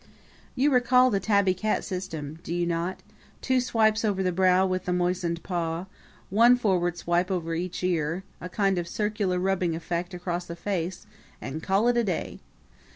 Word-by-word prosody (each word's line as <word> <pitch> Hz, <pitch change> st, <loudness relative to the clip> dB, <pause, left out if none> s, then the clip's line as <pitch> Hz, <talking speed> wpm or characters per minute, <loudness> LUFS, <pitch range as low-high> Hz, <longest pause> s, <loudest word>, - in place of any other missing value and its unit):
You 280 Hz, +3 st, +3 dB
recall 250 Hz, 0 st, +5 dB
the 200 Hz, -, +1 dB
tabby 200 Hz, -1 st, +3 dB
cat 215 Hz, +4 st, -1 dB
system, 160 Hz, -5 st, -5 dB
do 170 Hz, -, -4 dB
you 175 Hz, 0 st, 0 dB
not? 170 Hz, +2 st, -2 dB, 0.4 s
two 260 Hz, -1 st, +1 dB
swipes 220 Hz, -2 st, +2 dB
over 200 Hz, -3 st, +1 dB
the 185 Hz, -, +1 dB
brow 185 Hz, +1 st, +4 dB
with 185 Hz, 0 st, -2 dB
the 180 Hz, -, 0 dB
moistened 175 Hz, -1 st, -1 dB
paw, 170 Hz, -1 st, -2 dB, 0.5 s
one 235 Hz, +5 st, +6 dB
forward 180 Hz, -7 st, +1 dB
swipe 175 Hz, +2 st, 0 dB
over 170 Hz, -3 st, -2 dB
each 180 Hz, +2 st, -4 dB
ear, 170 Hz, 0 st, 0 dB, 0.2 s
a 180 Hz, -, -6 dB
kind 195 Hz, -1 st, +1 dB
of 170 Hz, -, -4 dB
circular 210 Hz, -1 st, -1 dB
rubbing 180 Hz, -2 st, 0 dB
effect 175 Hz, +2 st, -3 dB
across 175 Hz, 0 st, -3 dB
the 170 Hz, -, -6 dB
face 185 Hz, 0 st, -3 dB, 0.3 s
and 155 Hz, +4 st, -5 dB
call 195 Hz, +6 st, +2 dB
it 245 Hz, 0 st, +3 dB
a 235 Hz, -, +3 dB
day! 185 Hz, -6 st, -3 dB
185 Hz, 175 wpm, -26 LUFS, 175-205 Hz, 0.5 s, one